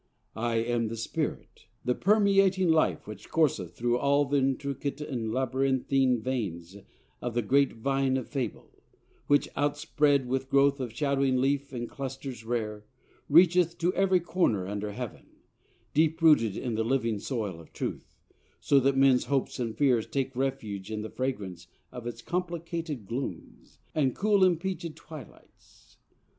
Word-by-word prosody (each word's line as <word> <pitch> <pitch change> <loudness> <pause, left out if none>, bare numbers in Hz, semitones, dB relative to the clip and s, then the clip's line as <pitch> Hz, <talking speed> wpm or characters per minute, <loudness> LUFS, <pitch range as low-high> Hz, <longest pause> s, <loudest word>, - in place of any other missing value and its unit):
I 115 +1 -1
am 115 0 0
the 115 +1 -5
Spirit, 115 - -4 0.2
The 125 - +2
permeating 195 - +3
life 160 -1 +2
which 105 -1 -10
courseth 105 - +1
through 120 +1 0
All 140 +2 +3
th' 140 - -6
intricate 140 +1 -1
and 125 -7 -3
labyrinthine 130 0 +1
veins 95 -9 -3 0.5
Of 120 -1 -4
the 120 - +1
great 140 +5 +3
vine 135 +3 0
of 130 - -4
Fable, 130 -6 -5 0.5
which, 145 0 +3
outspread 145 -1 +1
With 130 +1 -2
growth 140 0 +4
of 125 -3 -3
shadowing 135 0 +1
leaf 140 +1 0
and 120 -2 -4
clusters 135 -3 -6
rare, 105 -3 -3 0.4
Reacheth 170 +2 +5
to 175 +2 +1
every 190 -1 +3
corner 165 - 0
under 105 +1 -3
Heaven, 105 - -7 0.7
Deep 160 +1 +2
rooted 150 - +4
in 120 -3 -3
the 110 +1 0
living 115 -3 0
soil 105 -8 -3
of 80 - -15
truth: - - -6 0.4
So 140 - +4
that 135 +1 +2
men's 135 -2 +4
hopes 135 -1 -1
and 115 -3 -3
fears 125 -6 +3
take 135 -1 -2
refuge 120 -7 -3
in 110 -1 -4
The 110 - -7
fragrance 100 -9 -4 0.2
of 125 -1 -7
its 120 -1 -7
complicated 170 - -3
glooms 120 +7 -6 0.2
And 135 -5 +1
cool 210 0 +2
impleachèd 175 -2 +1
twilights. 155 -8 -15
135 Hz, 150 wpm, -28 LUFS, 115-145 Hz, 0.7 s, Reacheth